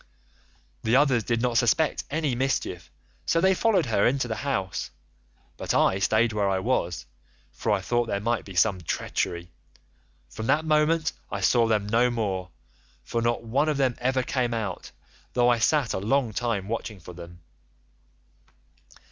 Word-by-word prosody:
The 110 +2 +1
others 130 -4 +3
did 115 +1 -1
not 120 -2 +2
suspect 150 +7 +1
any 150 -2 -1
mischief 120 -10 -2 0.4
so 165 - +3
they 190 +2 +4
followed 195 -3 +2
her 110 -4 +2
into 130 0 0
the 110 - -3
house, 115 -10 -2 0.7
but - - -2
I 95 - +3
staid 110 +3 +2
where 100 -2 +1
I 95 - +1
was, 95 -5 -1 0.5
for 110 - -2
I 100 -2 +1
thought 120 +4 0
there 100 - -1
might 115 +3 -1
be 95 - -11
some 95 0 +2
treachery. 85 +1 -3 0.8
From 110 - -6
that 150 +4 +2
moment 155 +1 +2 0.2
I - - -4
saw 120 -2 +3
them 105 -2 +1
no 115 +3 +3
more, 100 -6 -2 0.5
for 115 - -2
not 115 0 0
one 135 +7 +1
of 150 - 0
them 130 -3 +2
ever 130 +1 +1
came 125 -2 -1
out, 100 -5 -4 0.4
though 120 -1 +3
I 120 -1 +3
sat 140 +1 +2
a - - -1
long 115 +3 0
time 110 -4 -2
watching 110 -2 -4
for 90 +1 -11
them. 85 0 -12
115 Hz, 165 wpm, -26 LUFS, 100-130 Hz, 0.8 s, they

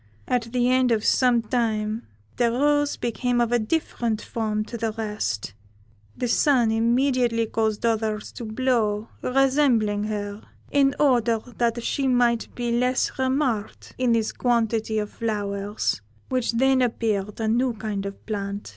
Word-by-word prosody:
At 235 -2 -1
the 245 0 +2
end 255 0 +3
of 220 -2 +1
some 245 -3 +3
time 220 -1 -1 0.3
the 235 -1 +2
rose 290 +3 +2
became 240 +1 -1
of 235 -1 +1
a 240 - +3
different 230 -3 -1
form 215 -2 -2
to 235 - -8
the 225 -1 -1
rest; 210 - -3 0.6
the 250 - -1
Sun 240 -1 +3
immediately 235 0 +2
caused 220 0 -1
others 220 -2 -1
to 235 - -7
blow, 220 -2 0
resembling 255 -6 +2
her, 205 -1 -4 0.3
in 275 -1 +3
order 240 -5 +3 0.2
that 235 0 +1
she 275 +2 0
might 240 -2 +2
be 240 -1 -2
less 250 +2 0
remarked 260 -5 -1
in 250 -2 +3
this 225 -1 +1
quantity 225 -2 0
of 210 -1 -2
flowers, 205 - -2 0.3
which 255 -2 0
then 265 +2 +3
appeared 215 -4 -1
a 220 - -1
new 240 +3 +2
kind 205 -2 -4
of 200 - -10
plant. 200 -1 -4
230 Hz, 145 wpm, -24 LUFS, 215-250 Hz, 0.6 s, end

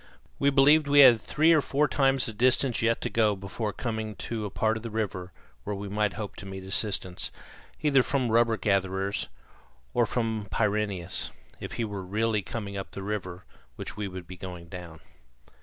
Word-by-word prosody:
We 140 - +4
believed 145 +2 +5
we 145 0 +7
had 120 -5 +8
three 160 +7 +3
or 155 - +5
four 145 +2 +1
times 135 -2 +2
the 115 - -4
distance 125 +2 +2
yet 115 0 +2
to - - -1
go 110 -2 +3
before 100 +3 -4
coming 110 -2 -4
to 105 +3 -4
a - - -3
part 110 +3 +1
of 110 - -5
the 115 - -5
river 100 -5 -3 0.3
where 105 - -3
we 100 +1 -6
might 105 -1 0
hope 100 +1 -6
to 100 - -8
meet 95 -1 -7
assistance, 95 -2 -1 0.5
either 140 -3 +5
from 125 -2 0
rubber 115 0 +3
gatherers, 95 -1 0 0.6
or 120 -2 +3
from 110 -3 -2
Pyrineus, 100 -5 -1 0.3
if - - -6
he 115 - -1
were 100 -2 -5
really 105 +3 0
coming 100 +2 -5
up 95 -1 -5
the 95 - -6
river 95 -3 -4 0.3
which - - -6
we 105 -1 -3
were 95 -1 -6
going 90 -1 -9
down. 85 -3 -9
105 Hz, 185 wpm, -28 LUFS, 95-115 Hz, 0.6 s, had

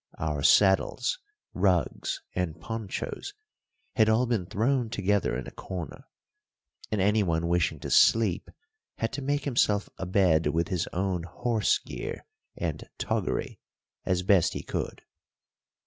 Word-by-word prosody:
Our 75 -3 -2
saddles, 100 - +3 0.3
rugs, 90 -6 0
and 85 -3 -2
ponchos 115 - -5 0.6
had 110 -2 +4
all 110 +3 +3
been 115 -7 -1
thrown 120 +4 0
together 100 - 0
in 65 - -5
a - - -8
corner, 85 -6 -7 0.9
and 110 - 0
anyone 95 -5 +2
wishing 85 -3 +1
to - - -5
sleep 110 -6 +4 0.5
had 115 - -2
to 140 - -3
make 145 +1 -1
himself 105 -6 +2
a 95 - -3
bed 90 -4 +3
with 85 +4 0
his 90 -4 -1
own 95 -1 -1
horse 110 +4 0
gear - - -7 0.3
and - - -4
toggery - - -2 0.4
as 90 -1 0
best 95 -3 +4
he - - -5
could. - - -4
95 Hz, 130 wpm, -28 LUFS, 85-110 Hz, 0.9 s, had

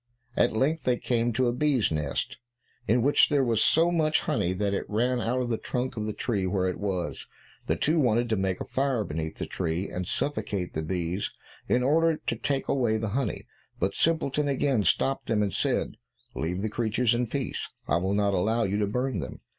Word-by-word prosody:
At 120 - +3
length 150 +6 +1
they 125 -1 +2
came 120 -1 0
to 125 +2 +2
a 120 - +1
bee's 135 - +2
nest, 75 +6 -2 0.5
in 120 +2 +3
which 145 +2 +5
there 145 -2 +3
was 115 -3 +2
so 165 +2 +4
much 155 -2 +2
honey 90 - 0
that 100 +2 -1
it 100 - -3
ran 120 +3 +1
out 125 +3 0
of 120 - -3
the 115 - 0
trunk 125 +1 -3
of 110 -1 -3
the - - -1
tree 100 -6 -1
where 95 0 0
it 90 - -3
was. 95 -4 -3 0.4
The - - +2
two 155 +2 +1
wanted 120 -3 +2
to 110 - +2
make 95 -2 -1
a - - -4
fire 130 -4 0
beneath 80 -2 -4
the - - -3
tree, 85 +2 -2
and 90 -1 -4
suffocate 100 -10 -2
the 80 - -2
bees 90 +3 -2 0.4
in 125 - +2
order 160 +4 +3
to 115 - -3
take 135 +4 -2
away 120 -5 +1
the 110 -1 -2
honey, 125 +1 -2 0.3
but 95 +2 0
Simpleton 150 -3 +2
again 135 -5 +1
stopped 135 +7 +1
them 110 -2 +2
and 100 -3 -2
said, - - 0 0.4
"Leave 90 +4 -2
the 110 - 0
creatures 115 +2 +1
in 120 +1 0
peace, 135 +3 -3 0.2
I - - +2
will 95 +3 0
not 100 -1 +2
allow 110 +5 +1
you 100 +1 0
to 105 - +1
burn 125 +5 -1
them." - - -7
115 Hz, 210 wpm, -27 LUFS, 100-130 Hz, 0.5 s, which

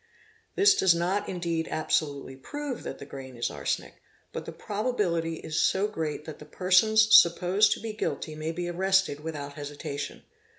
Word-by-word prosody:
This 405 +1 +6
does 185 - +4
not 185 +4 -1
indeed 170 -3 -2
absolutely 145 -3 -1
prove 285 - -6
that - - -6
the - - -9
grain 130 -3 -9
is 120 - -1
arsenic, - - -4 0.3
but - - -5
the - - -6
probability 200 -7 -1
is 155 -1 -2
so 195 +2 +2
great 160 -7 -4
that 155 - -8
the 150 - -11
persons 215 +7 +4
supposed 180 +4 +5
to - - -8
be 225 -1 -5
guilty 170 -6 -3
may 155 +1 -4
be 175 +1 -4
arrested 190 -3 +1
without 150 -2 -6
hesitation. 145 -1 -6
170 Hz, 165 wpm, -27 LUFS, 150-200 Hz, 0.3 s, This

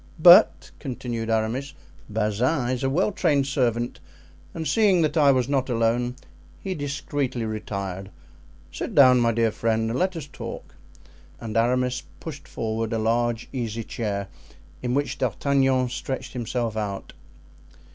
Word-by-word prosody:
"But," 175 +2 +7
continued 120 -4 -4
Aramis, 115 +5 -1 0.3
"Bazin 110 +6 0
is 130 +1 -2
a 135 - +2
well 180 +9 +1
trained 145 -7 +2
servant, 120 -3 -1 0.5
and 160 -1 -4
seeing 200 -6 +4
that 155 - 0
I 145 -3 +6
was 130 -2 +1
not 135 -2 0
alone 120 +1 +1 0.4
he 195 - -3
discreetly 140 -4 -3
retired. 100 -3 -4 0.6
Sit 80 - -5
down, 130 -3 +7
my 115 -1 +3
dear 115 -1 +1
friend, 110 0 0
and 125 - -1
let 185 0 0
us 160 -4 -5
talk." 145 - -8 0.7
And 110 -2 -6
Aramis 125 +2 +1 0.2
pushed 145 -4 -8
forward 110 0 -3
a - - +1
large 115 +1 0
easy 115 -3 -3
chair, 100 -3 -3 0.5
in 125 0 -1
which 145 +1 -1
D'Artagnan 135 -2 +1
stretched 130 +1 -5
himself 120 -2 -2
out. 105 -3 -4
125 Hz, 140 wpm, -24 LUFS, 115-140 Hz, 0.7 s, But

